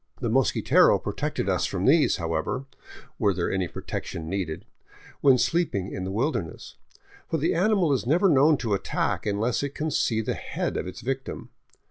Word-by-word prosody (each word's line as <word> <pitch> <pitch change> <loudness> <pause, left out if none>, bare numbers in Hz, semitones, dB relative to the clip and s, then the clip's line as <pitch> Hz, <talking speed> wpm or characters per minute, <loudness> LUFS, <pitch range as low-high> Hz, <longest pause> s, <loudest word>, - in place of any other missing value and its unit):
The 120 -4 -2
mosquitero 130 +1 +4
protected - - -3
us - - +1
from 95 -1 -2
these, 150 +3 +4
however, 85 +9 -2 0.5
were 95 -4 +1
any 95 -2 0
protection 80 -1 -6
needed, 90 -3 -3
even - - -24
when 135 -2 +6
sleeping 125 - 0
in 95 - -4
the 95 - -4
wilderness; 115 - -3 0.5
for 160 - 0
the 155 - +1
animal 185 -3 +2
is 125 -3 -1
never 175 +8 +4
known 150 -1 +5
to 110 - 0
attack 100 +2 -1
unless 105 +4 0
it 140 -1 -4
can 155 +1 -2
see 110 -4 +1
the - - -2
head - - -4
of - - -3
its 90 - -8
victim. 135 +1 -5
120 Hz, 170 wpm, -26 LUFS, 95-145 Hz, 0.5 s, when